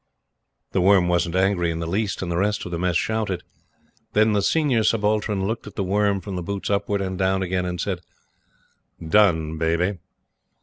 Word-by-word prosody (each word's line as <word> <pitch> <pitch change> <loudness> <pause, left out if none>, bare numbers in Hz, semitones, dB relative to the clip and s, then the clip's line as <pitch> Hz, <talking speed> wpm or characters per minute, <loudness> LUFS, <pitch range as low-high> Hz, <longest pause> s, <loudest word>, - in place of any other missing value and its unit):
The 95 - +1
Worm 95 -1 +5
wasn't 85 0 +1
angry 95 -2 +2
in 80 - -2
the 85 - -3
least, 95 +3 -2
and 85 - -3
the - - -1
rest 105 +4 0
of 90 - -6
the 85 - -3
Mess 90 -2 +1
shouted. 110 -3 -1 0.7
Then 110 +1 +4
the 100 - +2
Senior 135 - +2
Subaltern 105 -2 +1
looked 110 +1 -3
at 105 - -10
The 100 - -1
Worm 100 +1 +1
from 95 +1 -6
the 90 - -3
boots 100 +3 -4
upwards, 100 0 0
and 95 0 -4
down 95 0 +1
again, 90 0 -1
and 90 -1 -4
said, 95 -4 -2 1.1
"Done, 80 -5 +3
Baby." 85 +4 0
95 Hz, 185 wpm, -23 LUFS, 90-105 Hz, 1.1 s, Worm